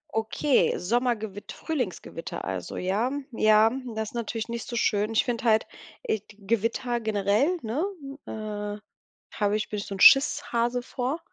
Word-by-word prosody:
Okay, 225 +5 +2
Sommergewitt 220 -1 -1
Frühlingsgewitter 245 - -4
also, 95 -2 -4
ja. 205 +8 0 0.2
Ja, 215 0 +5 0.2
das 220 -1 -2
ist - - -20
natürlich 230 -1 -3
nicht 235 0 -5
so 240 - -5
schön. 210 -1 +1
Ich - - +3
finde 245 +1 -2
halt 220 -1 +4 0.4
äh, 220 - 0
d 205 +1 -19
Gewitter 230 +3 0
generell, 220 - +1
ne, 230 +8 -2 0.5
äh, 210 -1 -5 0.6
habe 205 0 +1
ich 215 - -4
bin 210 - -3
ich - - -6
so 195 - -5
'n - - -9
Schisshase 245 -3 +5
vor. 265 +6 -3
220 Hz, 155 wpm, -27 LUFS, 210-240 Hz, 0.6 s, Ja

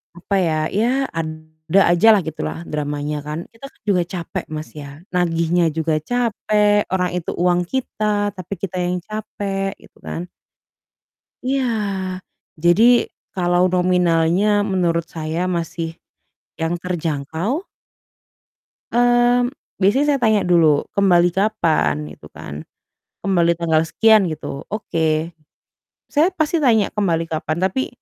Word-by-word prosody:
apa 185 +3 -3
ya, 160 -3 +1
ya 220 +4 +1 0.2
ada 155 +2 -2
aja 175 +6 +4
lah 200 - +2
gitulah 160 +1 -5
dramanya 150 0 -2
kan. 150 +2 -3
Kita 230 +4 -12
kan - - -34
juga 180 -3 +3
capek 175 -3 -4
Mas, 155 0 -6
ya 145 +2 -10
nagihnya 170 -1 +1
juga 160 -1 +1
capek, 210 0 +1
orang 180 -1 +1
itu 165 - -5
uang 175 0 +2
kita, 210 -5 -1
tapi 185 +2 -6
kita 190 -2 -4
yang 180 +1 -1
capek 195 -2 -4
gitu - - -20
kan. 175 +1 -5 1.1
Iya, 265 +1 0 1.0
jadi 225 +8 +5 0.2
kalau 175 -1 +2
nominalnya 180 +3 +2
menurut 175 -4 0
saya 160 0 -4
masih 170 -1 -3 0.7
yang 165 +1 0
terjangkau. 170 - -2 1.3
Mmm, 245 0 +3 0.3
biasanya 230 +10 +3
saya 275 - 0
tanya 220 -3 +3
dulu, 165 -4 +4
"Kembali 175 -3 +4
kapan?" 160 - +1
gitu - - -14
kan. 75 +1 -8 0.6
"Kembali 170 -3 +2
tanggal 160 -2 +2
sekian," 215 +2 +4
gitu. 150 -3 -6
Oke, 165 -5 -1 0.8
saya 305 +4 +4
pasti 315 0 +1
tanya 225 -8 +3
kembali 170 -6 0
kapan, 155 0 -2
tapi 260 +8 0
175 Hz, 120 wpm, -20 LUFS, 160-210 Hz, 1.3 s, jadi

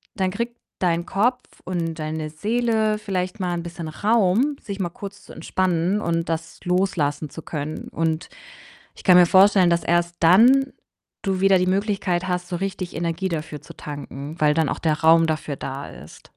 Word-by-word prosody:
dann 190 -2 0
kriegt 235 +4 -4 0.2
dein 170 -2 +1
Kopf 245 +5 +1 0.2
und 170 -3 -2
deine 155 0 -3
Seele 220 +4 0
vielleicht 185 -3 -3
mal 180 -1 -1
'n 170 - -2
bisschen 170 -1 -7
Raum, 220 - +2
sich 200 -2 -6
mal 180 - 0
kurz 200 0 -10
zu - - -12
entspannen 185 +2 0
und 165 -1 -1
das 165 0 -4
loslassen 160 -5 0
zu 160 - -9
können. 150 0 -5
Und 160 0 -2 0.7
ich - - -14
kann 180 -2 +7
mir 175 - +8
vorstellen, 190 -1 +6
dass 170 0 +1
erst 175 0 +1
dann 245 +11 +6 0.5
du 190 -2 -1
wieder 195 -1 +5
die 180 - +1
Möglichkeit 190 -2 0
hast, 180 0 -2
so 175 - -2
richtig 190 -1 -4
Energie 170 +3 -2
dafür 155 -2 -4
zu - - -12
tanken. 145 0 -7
Weil 150 -1 +4
dann 160 -1 +1
auch - - -3
der 155 -2 0
Raum 165 +1 +6
dafür 155 -2 -2
da 135 +1 -6
ist. 70 +6 -14
175 Hz, 180 wpm, -23 LUFS, 160-195 Hz, 0.7 s, mir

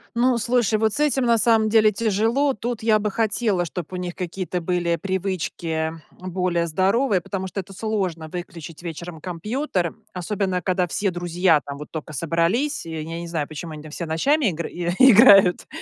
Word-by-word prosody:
Ну, 245 0 +3
слушай, 235 -2 +1
вот 220 -1 +1
с - - -4
этим 280 -4 +2
на 235 -1 +4
самом 220 0 +3
деле 215 -1 +5
тяжело. 225 +7 +1
Тут 235 +1 -4
я 220 -1 +4
бы 210 0 -2
хотела, 210 -4 0
чтоб 170 0 -6
у - - -3
них 180 -1 -4
какие-то 180 0 -4
были 170 0 0
привычки, 190 -2 -3 0.5
эм, 185 0 -6
более 175 -2 0
здоровые, 195 - +2
потому 190 +2 -4
что 190 - -5
это 195 +1 -8
сложно 190 -7 -3
выключить 165 -3 -8
вечером 170 -1 -7
компьютер, 185 - -2 0.2
особенно 185 0 -2
когда 180 -1 0
все 195 +3 -1
друзья 175 -2 +2
там 140 0 -8
вот 150 +1 -10
тока 155 -1 -6
собрались. 170 - 0
И 165 - -7
я 160 +1 -5
не 170 - -6
знаю, 160 -4 -2
почему 155 +1 -7
они 150 - -8
там 155 - -11
все 170 - -5
ночами 270 - +1
игры 170 -2 -2 0.3
играют. 205 -7 +7
185 Hz, 180 wpm, -23 LUFS, 170-220 Hz, 0.5 s, играют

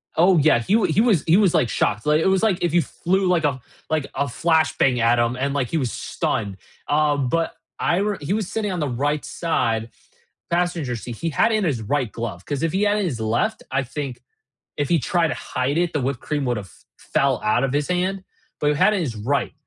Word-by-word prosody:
Oh, 175 +2 +5
yeah, 150 -5 +4
he 155 - -1
he 210 - +2
was 220 -9 +3
he 165 +4 +5
was, 200 -5 +3
like, 120 - +2
shocked, 105 +1 0
like, 150 +1 +3
it - - +2
was 190 0 +3
like 210 -5 +2
if 170 -2 0
you 175 - +5
flew 185 +6 -1
like 175 -3 +2
a 135 -3 0 0.3
like 155 -3 0
a 140 - 0
flash 160 +3 +1
bang 125 -3 +3
at 115 +1 +3
him 120 +1 +1
and, 140 +2 -1
like, 135 -4 -1
he 165 - -1
was 130 -6 -1
stunned, 100 -3 -3 0.3
uh, 150 0 +2
but 145 +4 0 0.3
I 175 0 +1
re 205 0 0
he 145 +7 -2
was 210 -4 -1
sitting 210 -3 -2
on 180 - -3
the 150 -3 -1
right 145 +4 -1
side- 115 -9 -1 0.6
passenger 170 -7 0
seat, 115 +1 -7
he 165 +7 -3
had 160 +9 +2
in 215 -1 +1
his 140 -10 0
right 125 +1 -1
glove, 110 -6 -6
'cause 145 -1 -3
if 165 - +1
he 195 +2 +1
had 205 0 +2
in 205 - 0
his 135 -10 -3
left, 120 - -1
I 135 0 +1
think, 135 0 -6 0.6
if 145 -2 -1
he 170 - +3
tried 165 +5 +1
to - - -2
hide 135 +3 -2
it, 175 -1 +1
the 150 - 0
whipped 130 -1 -2
cream 145 -2 -2
would 120 - 0
have 105 -2 -5
f - - -21
fell - - 0
out 110 +5 +2
of 135 - -1
his 145 0 0
hand, 185 +2 -1 0.4
but 145 - +2
he - - +2
had 210 - +4
in 200 - 0
his 140 -9 -2
right. 125 +5 -1
150 Hz, 245 wpm, -22 LUFS, 125-175 Hz, 0.6 s, Oh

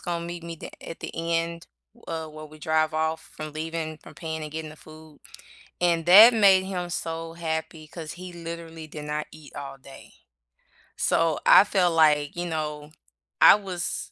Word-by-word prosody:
gonna 170 -1 -3
meet 170 0 -7
me 170 0 -6
the - - -9 0.2
at 165 - -8
the - - -5
end, 165 0 -2 0.4
uh, 160 -1 -4
where 155 0 -10
we 155 +1 -15
drive 155 0 +1
off 160 0 0 0.2
from 155 -1 -6
leaving, 160 0 -4
from - - -15
paying 160 -1 -5
and 150 - -7
getting 160 -1 -5
the 155 - -13
food 155 -1 -15 0.6
and 170 -2 +2
that 215 +7 +10
made 195 -3 +6
him 180 -2 -4
so 165 -1 -4
happy 160 -1 -4
'cause 160 -1 -8
he 180 0 -9
literally 165 -1 -8
did 150 -1 -9
not 150 0 -3
eat 150 -3 -14
all 135 -1 -7
day. 135 0 -14 0.8
So 165 -2 +1
I - - +9
felt 185 -4 +1
like, 150 -2 +3
you 175 0 -3
know, 150 -2 -4 0.5
I - - +10
was, 185 -5 -5
160 Hz, 180 wpm, -25 LUFS, 155-170 Hz, 0.8 s, that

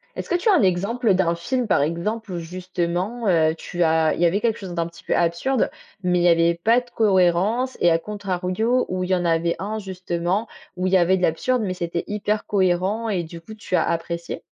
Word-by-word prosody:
Est-ce - - -6
que 355 - +1
tu 355 +5 -1
as 415 - +6
un - - +4
exemple 200 +4 +1
d'un 170 -2 +1
film, 245 +7 -2
par 165 - +3
exemple, 190 +7 -2
où 175 - -3
justement, 180 +5 -3
heu, 160 -3 +3
tu 175 +1 -3
as 160 -1 +3
il - - -4
y - - +5
avait 185 +5 +2
quelque 225 -1 0
chose 185 -3 -7
d'un 170 -1 -1
petit 170 - -15
peu - - -1
absurde 175 +10 +1 0.3
mais 180 -1 +2
il - - +1
y - - +5
avait 170 0 +4
pas 230 +2 +5
de 245 -1 -13
cohérence 205 +4 +2
et 175 - +5
à 165 - +3
contrario 205 +4 -1
où 185 0 -2
il 180 - -4
y 185 - +3
en 175 -1 -1
avait 170 0 +1
un, 210 +3 -3
justement, 185 +1 -2 0.3
où 185 +1 0
il 190 - -1
y - - +7
avait 185 +2 +3
de - - -5
l'absurde 225 +9 +1
mais 185 -2 -2
c'était 170 -1 -3
hyper 210 0 -2
cohérent 195 +3 0
et 180 -4 -1
du 165 +1 -10
coup 215 +6 -11
tu 205 -3 -3
as - - +3
apprécié? 170 0 -3
185 Hz, 235 wpm, -22 LUFS, 170-215 Hz, 0.3 s, y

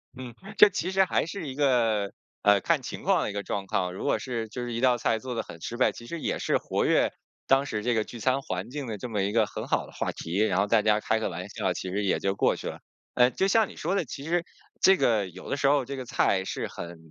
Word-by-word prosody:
嗯， 125 -2 -8 0.2
这 210 - +9
其 185 -2 -2
实 190 0 +4
还 - - +1
是 165 -2 -6
一 130 - -6
个， 115 -8 +2 0.3
呃， 105 -1 +6
看 - - +1
情 - - -6
况 - - +2
的 - - -2
一 - - -8
个 100 - -2
状况。 95 -2 -2
如 95 - -6
果 - - +1
是， 115 -2 -3
就 120 +3 -6
是 120 - -4
一 115 - -2
道 125 0 +4
菜 115 -1 +1
做 125 +3 -5
得 115 - -1
很 85 - -11
失 115 - -5
败， 125 - +3
其 115 - -11
实 165 +6 -6
也 - - -1
是 - - +1
活 - - -1
跃 - - +3 0.4
当 135 +1 +4
时 105 -6 -3
这 120 +2 +1
个 110 - +2
聚 120 - -10
餐 130 +4 +1
环 95 +2 -4
境 140 +1 -5
的 110 -4 -5
这 125 - -5
么 105 -3 0
一 100 - 0
个 110 -1 +3
很 - - -6
好 - - 0
的 - - -14
话 - - -2
题， 85 +3 -5
然 95 -3 +2
后 100 - +2
大 110 0 +3
家 105 0 +3
开 110 +1 0
个 110 - -1
玩 90 +2 -6
笑， 95 -2 -1
其 95 - -5
实 100 +3 -1
也 95 - +1
就 95 0 0
过 - - +2
去 - - -7
了。 - - -6 0.4
呃， 125 +1 +5
就 190 - +1
像 220 +1 +4
你 - - -12
说 175 +5 -1
的， 190 -5 0
其 140 +2 -7
实 170 +2 0 0.4
这 190 0 +6
个 110 -4 +2
有 90 +1 -11
的 - - -1
时 145 - -1
候 140 -1 +4
这 140 - -5
个 130 - -5
菜 100 -7 +1
是 - - -3
很， 85 0 -8
115 Hz, 310 characters per minute, -27 LUFS, 100-135 Hz, 0.4 s, 这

